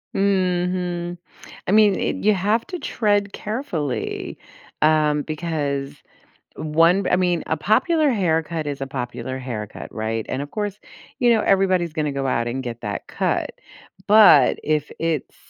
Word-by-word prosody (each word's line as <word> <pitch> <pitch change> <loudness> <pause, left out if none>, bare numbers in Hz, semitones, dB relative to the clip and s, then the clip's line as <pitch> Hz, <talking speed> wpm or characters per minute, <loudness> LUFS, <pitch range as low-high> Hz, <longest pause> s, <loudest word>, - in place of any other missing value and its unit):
Mhm. 180 -2 0 0.5
I - - +1
mean, 210 -2 +3
you 215 - +5
i - - -1
have 210 +5 +1
to 360 -2 -5
tread 205 -6 0
carefully, 195 - -4 0.4
uh, 155 -1 +4
because 145 -3 -3 0.6
one 165 +5 +2
I - - +4
mean, 180 -2 +1
a - - 0
popular 285 - +2
haircut 165 - 0
is 140 -1 -4
a 135 - -3
popular 130 0 -5
haircut, 110 -5 -7
right? 110 0 -3
And, 130 - -3
of 145 - -7
course, 205 -1 -3 0.4
everybody's 195 -7 +3
gonna 150 -3 -1
go 135 -1 -2
out 120 -2 0
and 130 +3 -3
get 120 -2 -6
that 105 -2 -5
cut. - - -1 0.6
But 210 -10 +7
if 150 -1 -1
it's, 165 -4 -2
165 Hz, 140 wpm, -22 LUFS, 140-200 Hz, 0.6 s, But